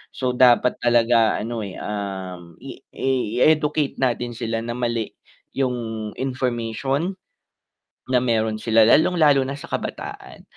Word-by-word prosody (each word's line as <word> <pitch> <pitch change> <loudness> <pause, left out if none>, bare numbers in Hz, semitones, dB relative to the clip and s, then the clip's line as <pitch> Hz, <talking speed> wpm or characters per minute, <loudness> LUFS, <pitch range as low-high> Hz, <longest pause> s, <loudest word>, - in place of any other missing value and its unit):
so 130 -1 -1
dapat 125 0 +4
talaga 120 -1 +3
ano 115 +1 -4
eh, 100 -3 -6
um, 95 -4 -6
i - - -9 0.6
i-educate 150 +1 +2
natin 120 -2 0
sila 115 -1 -3
na 120 - -4
mali 120 -2 -2 0.4
yung 115 -5 -2
information, 130 - -2 0.9
na 130 - +3
meron 110 -3 0
sila 110 +1 +3
lalong 155 +10 +4
lalo 140 -3 +5
na 135 - -4
sa 145 - -11
kabataan, - - -6
120 Hz, 125 wpm, -22 LUFS, 110-130 Hz, 0.9 s, lalo